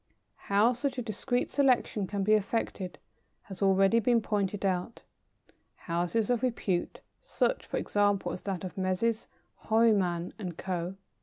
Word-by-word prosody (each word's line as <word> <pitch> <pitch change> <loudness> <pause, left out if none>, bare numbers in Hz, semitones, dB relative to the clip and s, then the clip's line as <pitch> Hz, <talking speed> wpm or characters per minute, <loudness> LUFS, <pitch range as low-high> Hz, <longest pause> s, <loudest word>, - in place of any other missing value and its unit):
How 210 +5 +4
such 265 +3 -2
a 250 - -2
discreet 240 +3 -1
selection 250 -7 +2
can 200 0 -2
be 215 +2 +3
effected 200 -3 -1 0.5
has 190 -1 -10
already 195 +3 +4
been 235 +1 +3
pointed 205 -2 -1
out. 185 +4 -2 0.7
Houses 175 +7 -1
of 245 - +1
repute 220 -8 -1 0.2
such, - - -1
for - - -3
example, 205 -1 +1
as 180 - -6
that 195 -3 -4
of 185 +1 -6
Messrs. 195 +5 0 0.4
Horniman 200 -6 +2
and 180 -5 -5
Co. 180 0 -3
205 Hz, 140 wpm, -29 LUFS, 185-230 Hz, 0.7 s, How